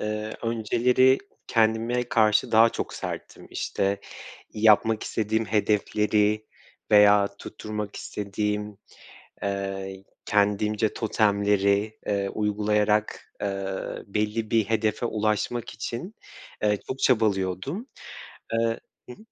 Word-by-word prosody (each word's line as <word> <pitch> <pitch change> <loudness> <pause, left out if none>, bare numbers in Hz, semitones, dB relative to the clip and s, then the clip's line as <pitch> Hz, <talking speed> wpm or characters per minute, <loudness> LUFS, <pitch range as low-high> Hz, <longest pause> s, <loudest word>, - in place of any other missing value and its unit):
Eee, 105 0 -3
önceleri 120 +3 +3 0.3
kendime 115 +2 +1
karşı 110 -1 +3
daha 115 +1 +7
çok - - -4
serttim. - - -7
İşte, 100 0 -1 0.5
yapmak 110 0 +4
istediğim 110 +1 -1
hedefleri 105 +1 +1 0.5
veya 105 -1 +7
tutturmak 105 -1 -6
istediğim, 105 0 -3 0.7
eee, 95 -1 -4 0.2
kendimce 105 +1 +1
totemleri, 100 -1 +1
eee, 100 -1 0
uygulayarak, 105 0 0
eee, 100 -1 -2 0.4
belli 105 +2 -2
bir 110 -3 +3
hedefe 110 +2 0
ulaşmak 110 +2 -1
için, 120 - -6 0.5
eee, 105 -1 +3
çok 130 +1 -4
çabalıyordum. 110 - +1 0.7
Eee 115 0 +1 0.3
Hı - - -7
hı. - - -27
105 Hz, 95 wpm, -26 LUFS, 105-110 Hz, 0.7 s, daha